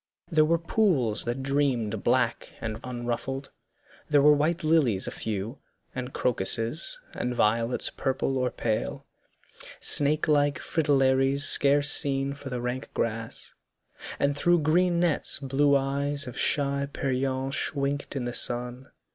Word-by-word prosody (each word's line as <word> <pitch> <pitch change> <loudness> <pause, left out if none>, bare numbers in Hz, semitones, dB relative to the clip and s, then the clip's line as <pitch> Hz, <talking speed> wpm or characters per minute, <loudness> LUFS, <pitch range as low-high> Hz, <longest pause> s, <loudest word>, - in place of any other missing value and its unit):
There 155 -2 +4
were 165 +2 +2
pools 165 - +1
that 120 +3 -3
dreamed 130 -7 -1
Black - - 0
and 110 0 -5
unruffled; 125 +2 -4 0.6
there 145 -2 +4
were 150 0 +7
white 155 +4 0
lilies 145 -11 +2
A - - -4
few, 110 +3 -5 0.3
and 130 0 -5
crocuses, 120 - -1
and 125 0 -3
violets 115 +2 +1
Purple 135 0 -2
or 125 0 0
pale, 110 -3 -3 0.7
snake 150 +2 +1
like 145 -2 +2
fritillaries 135 -2 +1
Scarce 145 +1 +5
seen 135 0 +3
for 140 -1 -9
the 125 -1 -4
rank 125 +2 -4
grass, 115 0 -3 0.6
and 140 0 0
through 175 +3 +2
green 170 +3 +2
nets 170 -4 +3
Blue 140 +1 +1
eyes 140 +1 -1
of 125 - -8
shy 140 -1 +1
peryenche 135 +2 -2
winked 140 0 -2
in 130 -3 -3
the 120 - -4
sun. 125 +2 -2
135 Hz, 135 wpm, -26 LUFS, 125-145 Hz, 0.7 s, were